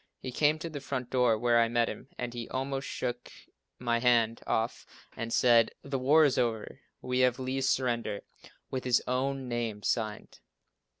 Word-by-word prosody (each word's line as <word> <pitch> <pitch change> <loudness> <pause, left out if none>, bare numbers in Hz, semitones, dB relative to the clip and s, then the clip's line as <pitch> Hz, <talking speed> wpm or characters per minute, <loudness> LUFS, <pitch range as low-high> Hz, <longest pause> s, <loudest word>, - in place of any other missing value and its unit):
He 130 - -6
came 150 +4 +2
to 165 - -5
the 150 -4 -6
front 130 -3 -4
door 125 -3 +3
where 120 +1 +3
I 115 - +3
met 120 0 +1
him - - -7
and 120 -1 -4
he 120 -2 -6
almost 135 +1 -3
shook 120 0 -4 0.5
my 120 -1 0
hand 115 -2 +3
off 115 +1 -1 0.3
and 115 0 -4
said, 115 -2 +5
"The 140 -1 -3
war 150 +5 +5
is 135 -3 +2
over. 115 -3 -2 0.2
We 125 0 -1
have 125 -1 +3
Lee's 130 +1 -1
surrender, 115 -5 0 0.5
with 130 -1 -3
his 125 -1 +2
own 130 +1 -1
name 115 -4 -3
signed." 110 -3 -2
125 Hz, 175 wpm, -30 LUFS, 115-130 Hz, 0.5 s, said